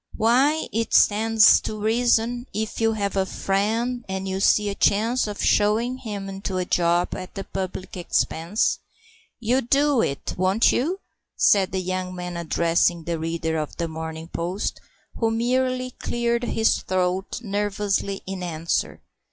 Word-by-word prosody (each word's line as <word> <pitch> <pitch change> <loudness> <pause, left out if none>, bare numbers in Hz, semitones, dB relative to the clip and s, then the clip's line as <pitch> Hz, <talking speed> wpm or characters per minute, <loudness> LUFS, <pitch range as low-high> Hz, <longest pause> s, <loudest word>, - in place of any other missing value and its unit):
"Why, 265 +8 +3
it 225 +1 0
stands 220 +1 +6
to 215 - -5
reason, 235 +2 +1
if 220 +1 -3
you 225 0 +3
have 200 -2 -2
a 195 - +2
friend, 225 +7 -1
and 190 0 -3
you 190 0 -2
see 210 +1 +3
a - - -2
chance 220 +5 +2
of 205 -1 -4
shovin' 225 +5 +2
him 205 -5 -5
into 195 -1 -4
a 180 - -1
job 175 0 +1
at 185 - -7
the 195 - -4
public 185 -1 -5
expense, 175 +2 0 0.6
you'll 245 +3 +1
do 275 +1 +2
it, 140 - -2
won't 190 +4 +3
you?" 355 +10 -1 0.3
said 195 -2 +3
the 190 0 -1
young 185 0 -3
man, 180 -1 -5
addressing 170 0 +1
the 170 0 -3
reader 160 0 -2
of 150 - -5
The 170 - -1
Morning 160 0 -6
Post, 180 +4 -3 0.4
who 225 - +2
merely 255 +2 0
cleared 235 0 -1
his 225 -1 +2
throat 185 +2 -1
nervously 205 -1 -1
in 190 -1 -5
answer. 165 -2 -2
200 Hz, 150 wpm, -24 LUFS, 180-230 Hz, 0.6 s, stands